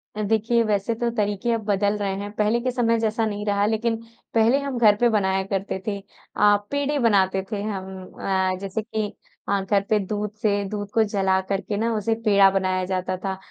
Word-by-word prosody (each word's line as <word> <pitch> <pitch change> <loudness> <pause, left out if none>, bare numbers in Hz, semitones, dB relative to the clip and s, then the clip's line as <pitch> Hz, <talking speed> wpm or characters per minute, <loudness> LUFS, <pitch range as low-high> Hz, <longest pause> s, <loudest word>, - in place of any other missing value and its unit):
अ, 215 - -3
देखिए 225 +2 +2
वैसे 210 +1 0
तो 235 +1 -1
तरीक़े 210 +2 0
अब 225 - -1
बदल 205 0 +1
रहे 195 -2 -2
हैं। 205 0 -5
पहले 215 +3 +2
के 255 0 -1
समय 230 -2 +1
जैसा 225 0 0
नहीं 210 -1 -3
रहा 200 0 +2
लेक़िन, 225 +1 0 0.4
पहले 230 +5 +4
हम 275 -3 -4
घर 215 -3 +5
पे 240 +1 +3
बनाया 190 -3 +1
करते 195 -1 -3
थे। 200 -1 -1 0.4
अ, 205 0 +5 0.2
पेड़ें 285 0 0
बनाते 195 -3 +3
थे 205 -1 -2
हम 190 -2 -5 0.2
अ, 190 -1 0
जैसे 195 +2 -3
कि 215 -1 -4 0.4
अ, 200 0 +2
घर 200 +1 +1
पे 215 - +4
दूध 210 +1 -3
से 205 -1 +1
दूध 205 -1 -4
को 225 - +4
जला 195 -2 +1
कर 195 0 0
के 205 - -4
ना 230 +1 0
उसे 215 +2 0
पेड़ा 200 -2 +6
बनाया 185 -1 0
जाता 185 0 -2
था 190 -1 -2
205 Hz, 210 wpm, -23 LUFS, 195-225 Hz, 0.4 s, पेड़ा